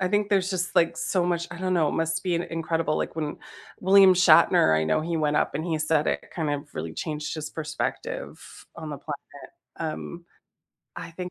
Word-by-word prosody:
I 185 - +1
think 205 +1 +1
there's 195 -1 +2
just 180 -2 -2
like 165 - +3
so 180 -3 0
much 170 -1 -1
I 175 - -8
don't 185 0 0
know, 160 -3 +3
it - - -2
must 165 0 -1
be 180 -2 0
an 170 - 0
incredible 165 -1 -1
like - - -3
when 155 -2 -3 0.4
William 190 0 +7
Shatner, 125 - +5
I 80 - +1
know 80 - +1
he 165 +1 -2
went 150 -2 +1
up - - +1
and 155 +3 -2
he 165 -3 -1
said 155 -1 +1
it - - -2
kind 155 -4 -1
of 145 +1 -4
really 80 0 -4
changed 155 0 -4
his 155 -1 -5
perspective 155 -2 -4 0.4
on 155 - -6
the 145 - -6
planet. 145 -1 -9 0.3
Um, 165 +2 -5 0.7
I 165 - -7
think 180 +2 -6
165 Hz, 210 wpm, -26 LUFS, 155-180 Hz, 0.7 s, William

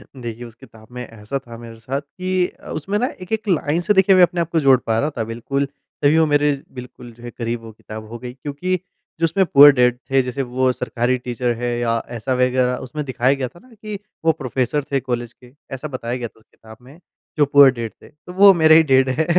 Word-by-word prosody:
देखिए, 120 -1 -7
उस 115 - -13
किताब 110 -1 -17
में 125 0 -6
ऐसा 115 +4 -6
था 120 -3 -12
मेरे 115 -1 -11
साथ 135 +5 -4
कि 185 +4 -2
अ, - - -15
उसमें 195 +7 -2
ना 250 - +1
एक-एक 220 +4 -4
लाइन 165 -2 +1
से 210 +4 +2
देखिए 190 -1 +5
अपने 175 0 +3
आप 170 - -3
को 165 - 0
मैं - - +3
जोड़ 135 -2 +6
पा 110 - +1
रहा 150 - 0
था। 115 - 0
बिल्कुल 140 +4 -2 0.4
तभी 145 +2 +4
वो 160 - +4
मेरे 145 -1 +2 0.3
बिल्कुल 125 -1 -11
जो 120 +1 -18
है 120 - -7
करीब 115 0 -4
वो 115 -1 -11
किताब 110 0 -10
हो 120 - -7
गई 125 0 -8
क्योंकि 145 +7 -3 0.4
जो 165 - +3
उसमें 190 +4 +1
पूअर 145 -3 +8
डैड 125 -1 +2
जैसे 135 0 +1
वो 130 0 0
सरकारी 125 0 -1
टीचर 125 0 -1
है 120 +1 -3
या 115 -1 0 0.2
ऐसा 130 +3 -2
वग़ैरह 125 0 +1
उसमें 150 +4 -5
दिखाया 130 +1 +1
गया 135 -2 -3
था 175 - -17
ना 255 -2 -20
कि 210 -2 -7 0.3
वो 160 - +6
प्रोफेसर 135 +2 -1
थे 140 - +2
कॉलेज 120 -1 -3
के 125 0 -19 0.2
ऐसा 145 +4 -6
बताया 125 -3 -4
गया 120 -2 -4
था 110 - -24
उस 110 - -28
किताब 110 0 -16
में 140 +7 -16 0.4
जो 145 - +4
पूअर 140 -1 +7
डैड 115 -3 -6
थे। - - -15
तो 160 +4 -14
वो 195 +1 +7
मेरे 160 -2 +5
ही 160 - +7
डैड 130 0 +4
हैं। 145 +5 0
130 Hz, 240 wpm, -20 LUFS, 120-155 Hz, 0.4 s, पूअर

